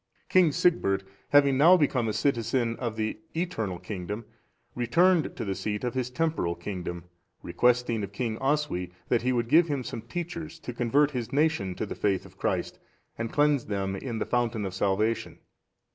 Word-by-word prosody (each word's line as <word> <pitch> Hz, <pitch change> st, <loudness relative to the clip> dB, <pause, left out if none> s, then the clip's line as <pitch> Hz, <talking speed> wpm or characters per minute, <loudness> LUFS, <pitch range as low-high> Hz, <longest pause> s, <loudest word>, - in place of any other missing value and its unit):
King 180 Hz, -4 st, +5 dB
Sigbert, 100 Hz, -, +2 dB, 0.3 s
having 140 Hz, -2 st, +5 dB
now 175 Hz, +5 st, +8 dB
become 130 Hz, -7 st, +1 dB
a -, -, +1 dB
citizen 115 Hz, -2 st, 0 dB
of 115 Hz, -3 st, -3 dB
the 110 Hz, -1 st, -2 dB, 0.2 s
eternal 115 Hz, -, -2 dB
kingdom, 105 Hz, +4 st, -6 dB, 0.5 s
returned 165 Hz, +8 st, +2 dB
to 115 Hz, -, -4 dB
the 100 Hz, -, -1 dB
seat 105 Hz, +3 st, -3 dB
of 125 Hz, -, -1 dB
his 130 Hz, -1 st, -1 dB
temporal 125 Hz, -, -1 dB
kingdom, 85 Hz, -1 st, -5 dB, 0.4 s
requesting 120 Hz, +4 st, +1 dB
of 100 Hz, -, -5 dB
King 110 Hz, +1 st, -2 dB
Oswy 135 Hz, -10 st, 0 dB, 0.2 s
that 120 Hz, -, +3 dB
he 125 Hz, +2 st, +1 dB
would 120 Hz, -2 st, 0 dB
give 165 Hz, +6 st, +5 dB
him 140 Hz, -4 st, -2 dB
some 115 Hz, -, -5 dB
teachers, 165 Hz, +6 st, -6 dB
to 125 Hz, -, -6 dB
convert 135 Hz, +5 st, +2 dB
his 120 Hz, -5 st, -4 dB
nation 140 Hz, -, +1 dB
to -, -, -3 dB
the -, -, -5 dB
faith 95 Hz, -3 st, 0 dB
of -, -, -16 dB
Christ, -, -, -2 dB, 0.4 s
and 115 Hz, 0 st, -4 dB
cleanse 145 Hz, -3 st, +2 dB
them 95 Hz, -2 st, -2 dB
in 115 Hz, +3 st, -4 dB
the -, -, -1 dB
fountain 120 Hz, -3 st, 0 dB
of 95 Hz, -, -4 dB
salvation. 105 Hz, +4 st, 0 dB
120 Hz, 175 wpm, -27 LUFS, 105-145 Hz, 0.5 s, now